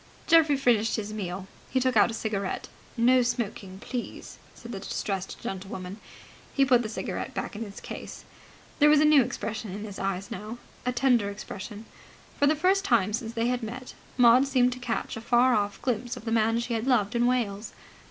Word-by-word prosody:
Geoffrey 320 -4 +5
finished 230 -5 +2
his 215 -1 -4
meal. 190 -2 -4 0.2
He 260 - +1
took 255 -1 +1
out 215 - +5
a 225 - -4
cigarette. 200 -4 -3 0.3
("No 250 +2 +5
smoking, 225 -6 -3
please!" 240 +4 -6 0.2
said 235 - -10
the 200 - -5
distressed 195 -1 -4
gentlewoman.) 190 0 -6 0.6
He 275 - +4
put 250 -2 +4
the 220 - -4
cigarette 215 - -4
back - - -4
in 220 - -4
its 200 -2 -9
case. - - -8 0.5
There 295 0 +7
was 300 -1 +6
a 305 - +5
new 300 -2 +7
expression 225 -4 -4
in 205 +3 -6
his 205 -2 -7
eyes 195 0 -3
now, 215 +5 -6 0.3
a - - +3
tender 245 -4 +2
expression. 205 +1 -8 0.5
For 285 - +4
the 305 - +4
first 375 +5 +2
time 210 - +2
since 225 0 -3
they 230 0 0
had 250 0 0
met 245 +3 -7 0.2
Maud 250 +2 +6
seemed 250 -2 +3
to 250 - -10
catch 240 -2 -3
a 225 - -6
far 245 +2 +4
off 205 -2 0
glimpse 245 -1 -2
of - - -11
the 225 - -2
man 225 0 +2
she 235 0 -3
had 225 +2 -2
loved 230 -4 +2
in 240 +1 +3
Wales. 220 -4 -1
230 Hz, 200 wpm, -27 LUFS, 205-250 Hz, 0.6 s, There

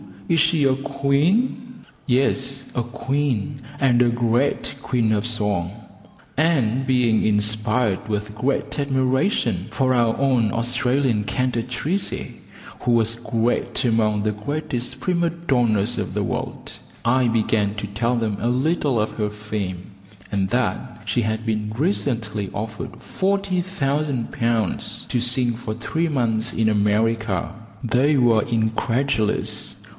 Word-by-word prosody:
Is 165 - +3
she 160 -1 +3
a 135 -1 +4
queen?" 155 - 0 0.2
"Yes, 135 +1 +1
a 120 - 0
queen, 135 0 -2 0.2
and 125 -3 +4
a 125 - +5
great 120 +4 0
queen 120 -5 +1
of 105 +1 +1
song;" 105 -6 0 0.7
and 135 -5 +2
being 125 -4 +3
inspired 110 0 +1
with 105 0 -3
great 130 +6 -1
admiration 130 - +1
for 130 +3 +1
our 115 -2 +2
own 130 -6 +2
Australian 125 -1 +1
cantatrice, 125 - -2 0.5
who 125 - 0
was 115 -1 +3
great 115 0 -1
among 110 -3 +2
the 110 - +1
greatest 125 +2 -4
prima 175 -2 +1
donnas 125 -11 +1
of - - -3
the - - 0
world, - - -4 0.3
I 125 +1 +3
began 110 -2 +1
to 105 - -4
tell 115 +5 0
them 110 -4 -1
a 115 - -1
little 135 0 +1
of 110 - -1
her 105 -2 -2
fame, 105 -3 -5 0.4
and 95 -2 0
that 125 0 -1
she 110 +3 +1
had 110 +1 -2
been 105 -1 -1
recently 115 - -1
offered 110 +1 -6
40,000 175 -9 -1
pounds 115 -3 -1
to 125 - +1
sing 125 0 +3
for 115 -1 -5
three 165 +7 -1
months 120 -5 0
in 110 -1 +2
America. 105 -1 +1 0.3
They 130 +5 +3
were 115 -4 +4
incredulous. 115 +1 0
120 Hz, 130 wpm, -22 LUFS, 110-135 Hz, 0.7 s, a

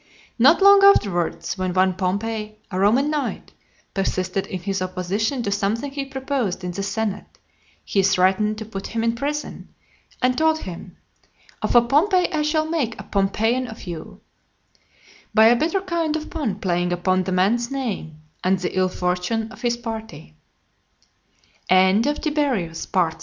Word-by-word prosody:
Not 300 +10 +6
long 400 0 +8
afterwards, 195 - +3
when 185 -1 -2
one 185 0 +3
Pompey, 210 +3 -3
a 185 - -2
Roman 245 +9 +3
knight, 300 -2 -3 0.4
persisted 190 0 -1
in 185 - -5
his 195 +1 -2
opposition 190 +7 -2
to 200 - -2
something 210 +7 -1
he 275 0 -4
proposed 265 -8 -3
in 180 - -3
the 190 +3 -4
senate, 205 +1 -3 0.5
he 195 - +1
threatened 195 +3 +2
to 220 - -6
put 195 -3 -6
him 225 0 -2
in 230 0 +2
prison, 290 +5 -4 0.5
and 250 0 +2
told 315 +1 +2
him, 175 -2 -9 0.6
"Of - - -1
a 240 - +8
Pompey 355 - +2
I 310 - +1
shall 310 +1 +1
make 295 -9 -2
a - - -6
Pompeian 220 +6 0
of 220 -1 -10
you;" 170 -3 -8 1.1
by 220 0 +7
a 235 +2 +7
bitter 335 +9 0
kind 340 -4 -1
of 310 0 -5
pun 290 - -2
playing 175 -2 0
upon 185 +1 +1
the 190 - -2
man's 210 +6 +1
name, 205 - -5 0.2
and 190 +1 +2
the 180 0 -4
ill 185 0 +2
fortune 180 +6 -2
of - - -13
his 240 -1 0
party. 220 - -8
220 Hz, 150 wpm, -22 LUFS, 185-270 Hz, 1.1 s, long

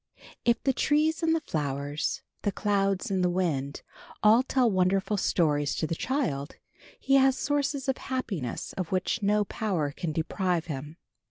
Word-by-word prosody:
If 235 -1 +2
the 270 - +2
trees 305 +5 +2
and 325 0 +3
the 325 - -1
flowers, 145 -1 -2 0.2
the 205 - 0
clouds 200 +1 0
and 190 -2 +1
the 180 - +3
wind, 155 -7 -1 0.4
all 220 +3 +7
tell 260 -1 +2
wonderful 190 +2 +2
stories 150 -7 +1
to - - -1
the 160 - -2
child 165 - -2 0.4
he 270 0 +3
has 265 0 +4
sources 285 -2 -1
of 265 - 0
happiness 200 - -4
of 185 -4 -4
which 190 +4 0
no 210 +1 +3
power 185 -10 -1
can 160 +3 -4
deprive 170 +2 -1
him. 150 0 -6
195 Hz, 160 wpm, -28 LUFS, 160-255 Hz, 0.4 s, all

